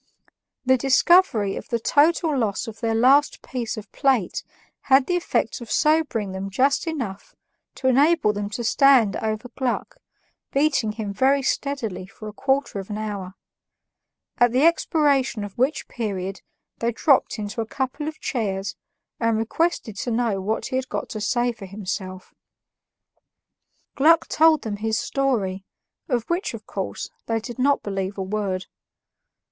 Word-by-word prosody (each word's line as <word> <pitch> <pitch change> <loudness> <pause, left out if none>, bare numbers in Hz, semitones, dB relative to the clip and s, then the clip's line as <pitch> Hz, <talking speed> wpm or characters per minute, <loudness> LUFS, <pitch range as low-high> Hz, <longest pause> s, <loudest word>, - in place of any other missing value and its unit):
The 260 0 +4
discovery 260 - +4
of - - -8
the 235 - 0
total 310 +5 +3
loss 220 -6 -1
of 225 -1 -9
their 225 -2 0
last 270 +5 +4
piece 240 -4 -4
of 210 -2 -9
plate 260 -10 +1 0.5
had 265 0 +6
the 360 - 0
effect 335 -9 -1
of 235 - -9
sobering 300 -10 +1
them 190 +1 -5
just 270 - +1
enough 240 -12 -5 0.4
to 260 - -2
enable 280 -2 +4
them 205 0 -3
to 225 +3 -4
stand 245 -4 +4
over 220 +2 -3
Gluck, 255 0 -3 0.5
beating 275 -7 +1
him 210 -2 -4
very 270 +5 +3
steadily 225 -11 -2
for 215 +1 -11
a 210 - -7
quarter 270 -2 0
of 195 - -8
an 210 - -4
hour; 200 -3 -5 1.0
at 245 -1 +5
the 260 +5 +3
expiration 285 -8 +2
of 205 -1 -8
which 270 +5 +1
period 195 -4 -4 0.4
they 235 0 0
dropped 265 +3 +2
into 210 +1 -4
a 225 - -4
couple 270 +5 -3
of 310 - -6
chairs 205 -5 -2 0.4
and 230 -1 +1
requested 225 - -1
to 245 - -3
know 225 -4 0
what 215 +4 -2
he 260 - -2
had 260 0 -3
got - - -4
to 215 - -5
say 245 +1 +1
for 210 -4 -10
himself. 185 -1 -6 1.6
Gluck 320 +4 +5
told 315 -1 +4
them 210 -2 -3
his 220 +1 -1
story, 215 -11 -1 0.5
of 240 -4 0
which, 345 +3 -1
of - - -11
course, - - -5 0.2
they 225 0 0
did 240 +3 -8
not 280 +2 +2
believe 195 -1 -3
a 190 - -2
word. 190 -1 -2
235 Hz, 155 wpm, -23 LUFS, 205-275 Hz, 1.6 s, had